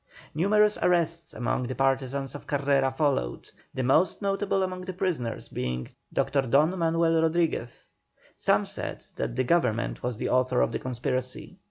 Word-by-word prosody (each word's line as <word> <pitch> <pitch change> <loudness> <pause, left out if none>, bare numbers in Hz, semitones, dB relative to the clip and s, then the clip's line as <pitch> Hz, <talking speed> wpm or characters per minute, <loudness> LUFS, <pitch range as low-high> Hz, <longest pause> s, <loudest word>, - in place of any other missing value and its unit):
Numerous 210 +6 +3
arrests 170 -1 +1
among 125 0 -2
the 130 - -4
partisans 135 0 0
of 145 - -9
Carrera 140 -1 +2
followed, 130 - -1 0.2
the 130 - -3
most 155 +8 +3
notable 195 -1 0
among 185 -1 -3
the 185 0 -5
prisoners 155 -12 -2
being 60 0 -3 0.2
Dr. 140 -1 +1
Don 145 +7 +3
Manuel 165 0 +2
Rodriguez. 165 -7 0 0.5
Some - - +2
said - - -6
that 120 - -2
the 130 - +1
Government 125 -6 +1
was 125 -3 -3
the - - -2
author 130 0 +2
of - - +2
the - - -2
conspiracy. 130 +7 -4
140 Hz, 155 wpm, -27 LUFS, 125-170 Hz, 0.5 s, Numerous